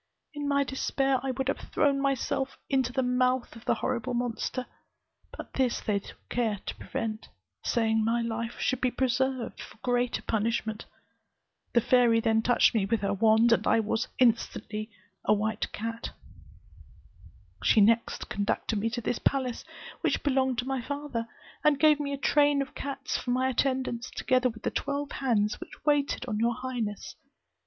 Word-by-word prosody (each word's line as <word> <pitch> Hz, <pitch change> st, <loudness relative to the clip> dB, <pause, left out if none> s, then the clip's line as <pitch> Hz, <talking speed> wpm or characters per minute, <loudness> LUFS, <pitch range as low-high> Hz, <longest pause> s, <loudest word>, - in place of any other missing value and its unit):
In 290 Hz, -1 st, -3 dB
my 280 Hz, 0 st, +3 dB
despair, 270 Hz, 0 st, 0 dB
I 270 Hz, -, -3 dB
would 265 Hz, +1 st, -2 dB
have 275 Hz, -, 0 dB
thrown 280 Hz, -2 st, +2 dB
myself 270 Hz, -1 st, 0 dB
also -, -, -24 dB
into 260 Hz, -2 st, +2 dB
the 260 Hz, +1 st, 0 dB
mouth 250 Hz, 0 st, +1 dB
of 230 Hz, -, -13 dB
the -, -, +2 dB
horrible 255 Hz, 0 st, -2 dB
monster, 245 Hz, +1 st, -2 dB, 0.7 s
but -, -, -9 dB
this 255 Hz, -3 st, +1 dB
they 205 Hz, -2 st, 0 dB
took -, -, -15 dB
care 225 Hz, -4 st, 0 dB
to -, -, -3 dB
prevent, 220 Hz, -1 st, -4 dB, 0.3 s
saying 220 Hz, -1 st, +1 dB
my 230 Hz, +2 st, +1 dB
life 230 Hz, 0 st, -3 dB
should 260 Hz, -, 0 dB
be 255 Hz, -, +3 dB
preserved 260 Hz, 0 st, -1 dB
for -, -, -11 dB
greater 245 Hz, -1 st, 0 dB
punishment. 220 Hz, 0 st, -1 dB, 0.9 s
The 235 Hz, -, +5 dB
fairy 240 Hz, -1 st, +4 dB
then 225 Hz, -1 st, +2 dB
touched 245 Hz, +1 st, +4 dB
me 205 Hz, -4 st, +1 dB
with 225 Hz, 0 st, +1 dB
her 200 Hz, 0 st, 0 dB
wand, 220 Hz, +3 st, +4 dB
and 230 Hz, -, +3 dB
I -, -, +4 dB, 0.4 s
instantly 225 Hz, -3 st, +1 dB
became 215 Hz, -2 st, -29 dB, 0.3 s
a -, -, +5 dB
white 215 Hz, +1 st, -2 dB
cat. 230 Hz, +2 st, -4 dB, 1.5 s
She -, -, +4 dB
next 230 Hz, +3 st, +3 dB
conducted 205 Hz, +1 st, -1 dB
me 225 Hz, +3 st, 0 dB
to 240 Hz, +1 st, -3 dB
this 240 Hz, -, -1 dB
palace, 260 Hz, -3 st, 0 dB, 0.4 s
which -, -, 0 dB
belonged 265 Hz, -3 st, +2 dB
to 245 Hz, -, -1 dB
my 270 Hz, -2 st, -1 dB
father, 280 Hz, -3 st, -4 dB, 0.4 s
and 295 Hz, -2 st, +4 dB
gave 305 Hz, -2 st, +5 dB
me 285 Hz, -1 st, -2 dB
a 280 Hz, -, -2 dB
train 290 Hz, 0 st, +3 dB
of -, -, -13 dB
cats 275 Hz, -1 st, -3 dB
for -, -, -6 dB
my 255 Hz, +1 st, +2 dB
attendants, 255 Hz, -2 st, -1 dB
together 255 Hz, -1 st, +1 dB
with 225 Hz, -1 st, -11 dB
the -, -, 0 dB
twelve 285 Hz, 0 st, -2 dB
hands 215 Hz, -6 st, 0 dB
which -, -, -11 dB
waited 290 Hz, -3 st, +1 dB
on 210 Hz, -3 st, -2 dB
your 235 Hz, +1 st, +2 dB
highness. 235 Hz, -5 st, -4 dB
245 Hz, 170 wpm, -28 LUFS, 225-265 Hz, 1.5 s, The